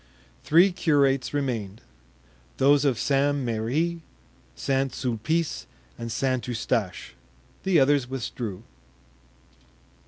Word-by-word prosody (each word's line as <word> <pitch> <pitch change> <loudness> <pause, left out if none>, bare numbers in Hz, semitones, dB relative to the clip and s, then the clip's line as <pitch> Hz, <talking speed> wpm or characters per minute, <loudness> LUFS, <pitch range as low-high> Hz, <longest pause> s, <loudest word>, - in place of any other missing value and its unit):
Three 175 +5 +5
curates 140 -7 +2
remained—those 95 - -2
of 130 -5 +2
St. 140 +3 +1
Merri, 135 +8 -1 0.5
St. 135 - 0
Sulpice 140 +7 -2 0.3
and 115 0 -6
St. 130 +1 -1
Eustache. 115 -5 -2 0.5
The 190 -3 +3
others 135 -2 +3
withdrew. 115 -5 -5
130 Hz, 85 wpm, -25 LUFS, 110-145 Hz, 0.5 s, Three